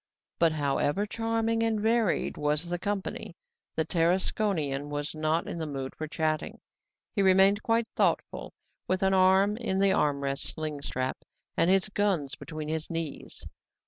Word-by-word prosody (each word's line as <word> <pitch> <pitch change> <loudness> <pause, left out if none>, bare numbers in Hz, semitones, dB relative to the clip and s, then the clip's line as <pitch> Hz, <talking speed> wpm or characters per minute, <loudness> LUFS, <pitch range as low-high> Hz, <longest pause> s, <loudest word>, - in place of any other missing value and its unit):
But, 165 -2 +4
however 145 +5 0
charming 225 +1 0
and 225 -1 +1
varied 220 -2 +1
was 150 +2 +1
the 175 0 -3
company, 200 -3 -3 0.4
the 160 - +1
Tarasconian 165 -4 0
was 145 +1 -3
not 155 +1 0
in 170 - -4
the 160 - -3
mood 135 -2 -5
for 155 - -5
chatting; 155 0 -2 0.6
he 200 - +2
remained 195 +2 +5
quite 230 +1 +1
thoughtful, - - 0 0.4
with 185 +1 0
an 190 0 +3
arm 190 +2 +4
in 230 -5 -1
the 195 0 +4
arm 145 -1 +1
rest 140 0 -1
sling 155 -2 -4
strap 130 -1 -3 0.4
and 170 - +3
his 195 +1 +4
guns 195 -9 0
between 155 -1 -6
his 160 0 -3
knees. 165 -3 -5
170 Hz, 155 wpm, -28 LUFS, 150-200 Hz, 0.6 s, remained